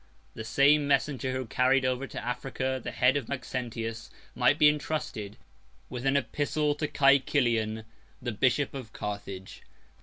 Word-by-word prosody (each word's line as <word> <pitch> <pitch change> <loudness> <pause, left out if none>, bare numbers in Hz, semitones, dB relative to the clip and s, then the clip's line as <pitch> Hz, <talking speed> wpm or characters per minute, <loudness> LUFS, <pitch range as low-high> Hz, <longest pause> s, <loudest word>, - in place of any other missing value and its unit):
The 110 - -6
same 140 +6 +4
messenger 140 -1 +1
who 130 0 -3
carried 130 +3 +2
over 130 +1 -1
to - - -7
Africa 130 +1 -2
the - - -3
head 125 +2 +3
of 140 -6 -2
Maxentius, 120 -3 -4 0.2
might - - +3
be 150 - +6
intrusted 150 -9 -2 0.5
with 125 +1 -3
an 135 +1 +4
epistle 145 +1 0
to 150 +1 -2
Cæcilian, 125 -6 +2 0.5
bishop 135 +2 +2
of 125 -5 -8
Carthage. 100 -2 -6
130 Hz, 140 wpm, -28 LUFS, 115-140 Hz, 0.5 s, be